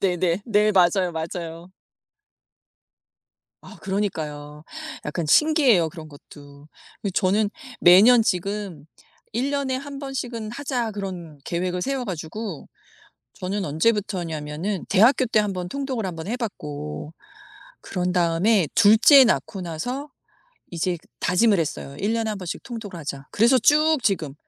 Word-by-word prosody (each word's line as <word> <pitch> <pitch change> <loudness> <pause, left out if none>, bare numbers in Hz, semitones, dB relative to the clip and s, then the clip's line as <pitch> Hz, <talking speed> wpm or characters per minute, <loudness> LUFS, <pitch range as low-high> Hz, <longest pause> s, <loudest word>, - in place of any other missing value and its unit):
네네 180 -1 0
네. 210 -1 +3
맞아요, 180 -1 +3
맞아요. 165 +2 -6 1.9
아 - - -13
그러니까요. 155 -7 -4 0.4
약간 160 +3 -3
신기해요 260 - +4
그런 155 0 -10
것도. 145 0 -15 0.4
예 200 - 0
저는 200 +3 +1 0.3
매년 220 +7 +7
지금 195 -5 -3 0.5
'1 255 +5 -1
년에 275 -2 -1
1 280 +1 -7
번씩은 245 -5 -5
하자.' 245 -2 -3
그런 180 -7 -7
계획을 180 +1 -2
세워 270 -2 -2
가지고 185 0 -6 0.7
저는 190 +2 -3
언제부터였냐면은 170 -1 -2
대학교 245 +6 +4
때 220 -1 +3
1 210 -1 -1
번 180 -1 -5
통독을 260 -2 -3
1 180 - -5
번 160 +1 -7
해 235 - -1
봤고 150 - -6 0.7
그런 180 -1 -2
다음에 180 +2 +2
2 220 -1 +6
째 275 +2 +8
낳고 205 -4 -1
나서 245 - -5 0.6
이제 175 0 -2 0.2
다짐을 200 +3 +3
했어요. 140 -2 -4
'1 205 +3 0
년에 225 -1 -1
1 210 - -4
번씩 180 -3 -6
통독을 220 -7 -7
하자.' 140 -2 -6
그래서 235 +5 +4
쭉 305 +3 +4
지금 160 -10 0
190 Hz, 255 characters per minute, -23 LUFS, 165-230 Hz, 1.9 s, 째